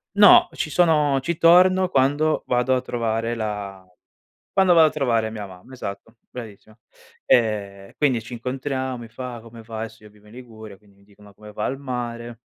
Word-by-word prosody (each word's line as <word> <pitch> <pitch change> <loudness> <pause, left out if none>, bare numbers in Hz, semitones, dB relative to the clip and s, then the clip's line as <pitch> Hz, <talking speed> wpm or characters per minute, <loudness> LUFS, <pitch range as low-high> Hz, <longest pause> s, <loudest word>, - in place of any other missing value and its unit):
No, 205 -1 +7
ci 155 - -3
sono 150 -5 +3
ci 160 +5 -3
torno 185 +2 +5
quando 145 +2 +1
vado 125 +1 +1
a 125 - -1
trovare 115 -1 -2
la 105 -4 -5 0.7
quando 190 -2 +4
vado 160 -1 +6
a - - -7
trovare 115 -7 0
mia 105 -2 -7
mamma, 95 +7 -15
esatto, 110 -1 -8
bravissima. 110 -2 -11 0.5
E 100 -4 +1
e - - -23
quindi 130 -6 +1
ci 120 +2 -9
incontriamo, 130 +1 -4
mi 115 -1 -10
fa: 120 0 -8
"Come 115 0 -13
va?" 110 0 -8
Adesso 110 -1 -8
io 105 - -14
vivo 105 0 -23
in 110 - -16
Liguria, 110 -5 -12
quindi 100 0 -26
mi 100 - -25
dicono: 100 0 -19
"Come 105 0 -13
va 105 - -4
al 135 - -3
mare?" 120 -3 -6
120 Hz, 185 wpm, -22 LUFS, 110-135 Hz, 0.7 s, No